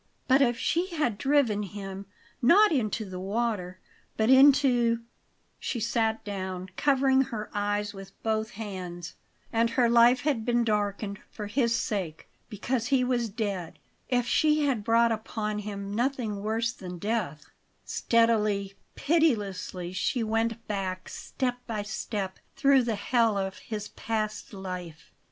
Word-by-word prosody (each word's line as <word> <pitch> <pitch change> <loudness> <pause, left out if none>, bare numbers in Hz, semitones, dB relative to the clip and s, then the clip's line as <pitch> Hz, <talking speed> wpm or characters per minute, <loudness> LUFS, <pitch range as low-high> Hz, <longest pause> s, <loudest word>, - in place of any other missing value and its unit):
But 265 +2 +5
if 240 -3 +3
she 340 +9 0
had 240 -10 0
driven 265 -7 +2
him, 195 -1 -7 0.3
not 390 - +6
into 220 -6 0
the 185 -1 -6
water 195 -2 -2 0.4
but 220 +3 +3
into 260 -4 +5 0.6
She 240 - -3
sat 225 0 0
down, 190 -2 -4
covering 270 -2 +3
her 215 -3 -6
eyes 205 0 -1
with 195 -1 -9
both 220 -1 0
hands. 180 -5 -6 0.4
And 230 +1 +3
her 240 +1 +3
life 240 +2 +5
had 275 -7 0
been 240 0 +2
darkened 205 -1 -1
for 210 - -7
his 235 +2 +1
sake, 185 -10 -3 0.2
because 230 +2 -2
he 270 -2 +3
was 245 -2 0
dead! 200 -5 -4 0.3
If 245 -1 +2
she 300 +4 +3
had 250 -7 0
brought 230 +2 +4
upon 215 -1 -3
him 200 -1 -5
nothing 235 -3 -1
worse 225 +2 -1
than 180 -6 -8
death 185 -7 -2 0.4
Steadily, 215 -4 +2 0.2
pitilessly 205 - 0
she 240 +6 0
went 225 +1 -1
back, 190 -3 -3
step 250 -2 -3
by 215 -3 -2
step, 200 -1 -4 0.2
through 275 -2 +5
the 230 -2 0
hell 225 +1 +2
of 190 0 -3
his 210 -2 -6
past 215 -1 -3
life. 180 -5 -7
220 Hz, 140 wpm, -28 LUFS, 200-240 Hz, 0.6 s, not